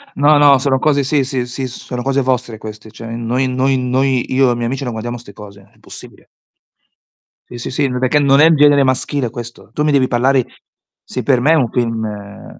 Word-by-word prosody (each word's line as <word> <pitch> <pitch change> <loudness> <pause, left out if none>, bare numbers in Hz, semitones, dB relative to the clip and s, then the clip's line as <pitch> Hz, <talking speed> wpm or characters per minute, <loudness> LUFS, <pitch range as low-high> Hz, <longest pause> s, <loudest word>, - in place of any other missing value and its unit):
No, 145 +1 +4
no, 140 -2 +6
sono 135 0 0
cose 145 0 +1
sì, 140 0 +1
sì, 130 -2 -3
sì, 130 +1 -5
sono 125 0 -7
cose 135 0 0
vostre 125 -3 -2
queste. 110 0 -10
Cioè 115 +1 -11
noi 120 +3 -2
noi 130 +1 0
noi 130 0 0
io 130 -1 +3
e - - +2
i - - -4
miei 120 0 -3
amici 135 +3 -3
non 120 - -3
guardiamo 120 +2 -5
'ste 115 -3 -13
cose, 100 -2 -13
è 100 - -24
impossibile. - - -14 1.2
Sì, 120 - -9
sì, 120 - -6
sì, 140 +1 0
ma 125 0 -3
perché 130 +3 +2
non 140 0 +4
è 155 - +7
il 165 -1 +5
genere 145 -1 +5
maschile 130 -1 -1
questo. 120 0 -10
Tu 150 - -1
mi 150 - +2
devi 135 -2 +2
parlare 130 +1 +1 0.6
sì, - - -5
per 130 -4 +2
me 150 +5 +3
è - - +5
un 125 -7 +1
film, 115 -3 -2
ehm 105 -1 -9
130 Hz, 230 wpm, -16 LUFS, 120-135 Hz, 1.2 s, è